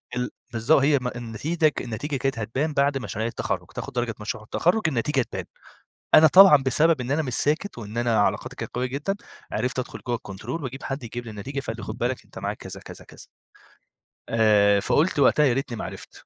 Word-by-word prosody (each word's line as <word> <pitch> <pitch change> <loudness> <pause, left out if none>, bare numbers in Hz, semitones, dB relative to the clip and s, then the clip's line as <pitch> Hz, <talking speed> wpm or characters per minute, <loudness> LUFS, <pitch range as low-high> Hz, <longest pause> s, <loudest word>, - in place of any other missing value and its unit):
ال 125 0 -1 0.2
بالضبط، 120 +6 +3
هي 140 +1 +4
م 125 - -2
النتيجة 125 +7 0
ك - - -6
النتيجة 125 +5 -4
كانت 135 -2 -1
هتبان 130 +8 -2
بعد 140 0 +2
مشاريع 110 -3 -3
التخرُّج 115 - -3
تاخد 140 - -6
درجة 120 -3 -1
مشروع 105 0 -5
التخرُّج، 175 - +1
النتيجة 135 0 +1
تبان، - - -4 0.7
أنا 160 - +9
طبعًا 190 -1 +9
بسبب 150 +3 +3
إن 125 +1 -4
أنا 150 +3 +2
مش 130 -5 -3
ساكت، 155 +5 0
وإن 110 0 -8
أنا 120 -2 +2
علاقاتي - - 0
كانت - - -7
قوية 125 +1 0
جدًا، 140 +9 -2 0.4
عرفت 125 +4 -1
أدخل 130 - -4
جوّه 120 -1 0
الكنترول 115 - -6
وأجيب 130 +1 -6
حد 135 0 -4
يجيب 120 +1 -6
لي 115 - -8
النتيجة، 120 +7 -5
فقال 115 -4 -5
لي 115 - -8
خد 110 +2 -6
بالك 125 +1 -2
أنت - - -12
معاك - - -3
كذا، - - -9
كذا، - - -11
كذا. - - -14 1.0
آآ، 105 -3 +4
فقُلت 150 - +1
وقتها 150 +2 +5
يا 130 - +3
ريتني 125 -2 -3
ما - - -4
عرفت، - - -10
125 Hz, 205 wpm, -25 LUFS, 115-145 Hz, 1.0 s, أنا